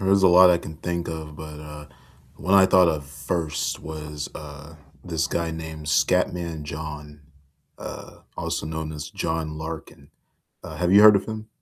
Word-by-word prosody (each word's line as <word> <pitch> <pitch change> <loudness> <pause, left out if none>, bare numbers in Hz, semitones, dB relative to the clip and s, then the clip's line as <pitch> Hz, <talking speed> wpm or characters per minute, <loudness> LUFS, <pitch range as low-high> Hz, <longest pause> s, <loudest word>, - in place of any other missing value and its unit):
There's 95 0 +3
a 95 - +7
lot 90 +1 +8
I 85 - +4
can 80 -1 -9
think 85 +1 -3
of, 80 -2 -6
but, 75 -1 -8
uh, 75 -1 -10 0.5
one 95 +4 +1
I 95 -1 +7
thought 90 -2 +5
of 75 -4 -1
first 75 +3 -3
was, 75 -1 -6
uh, 75 +1 -10 0.3
this 80 -3 -1
guy 85 -1 -2
named 80 -1 -7
Scatman 85 +1 +1
John, 75 -1 -7 0.6
uh, - - -9 0.2
also - - -3
known 80 0 -4
as 75 -1 -7
John 80 -2 -3
Larkin. 80 -3 -8 0.5
Uh, - - -8
have 90 0 0
you 100 +2 +8
heard 105 -1 +9
of 100 - 0
him? 110 0 -6
80 Hz, 170 wpm, -24 LUFS, 75-90 Hz, 0.6 s, heard